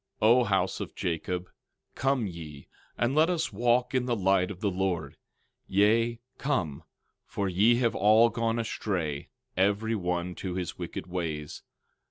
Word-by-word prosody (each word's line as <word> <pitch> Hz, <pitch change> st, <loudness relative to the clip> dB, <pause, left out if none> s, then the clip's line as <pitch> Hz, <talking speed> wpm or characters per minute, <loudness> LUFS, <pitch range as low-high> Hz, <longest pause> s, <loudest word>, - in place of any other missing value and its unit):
12:5 110 Hz, -, +4 dB
O 125 Hz, +1 st, +5 dB
house 95 Hz, -2 st, 0 dB
of -, -, -6 dB
Jacob, 90 Hz, +2 st, -2 dB, 0.5 s
come 135 Hz, -3 st, +1 dB
ye 80 Hz, -6 st, -8 dB, 0.3 s
and 120 Hz, +2 st, +1 dB
let 155 Hz, +3 st, +4 dB
us 170 Hz, -9 st, -1 dB
walk 120 Hz, +4 st, +2 dB
in 130 Hz, -1 st, +1 dB
the 120 Hz, -, +1 dB
light 95 Hz, -2 st, +2 dB
of 100 Hz, -3 st, -7 dB
the 100 Hz, -1 st, 0 dB
Lord; 95 Hz, -2 st, -2 dB, 0.5 s
yea, 115 Hz, +4 st, +3 dB, 0.2 s
come, 90 Hz, -, -1 dB, 0.5 s
for 100 Hz, -, -2 dB
ye 100 Hz, +6 st, +4 dB
have 120 Hz, -1 st, +1 dB
all 110 Hz, +4 st, +5 dB
gone 115 Hz, 0 st, -1 dB
astray, 90 Hz, -10 st, -2 dB, 0.3 s
every 100 Hz, +4 st, +1 dB
one 90 Hz, -3 st, -2 dB
to 90 Hz, 0 st, -5 dB
his 90 Hz, -3 st, -3 dB
wicked -, -, -5 dB
ways. 80 Hz, -5 st, -4 dB
100 Hz, 155 wpm, -28 LUFS, 90-115 Hz, 0.5 s, O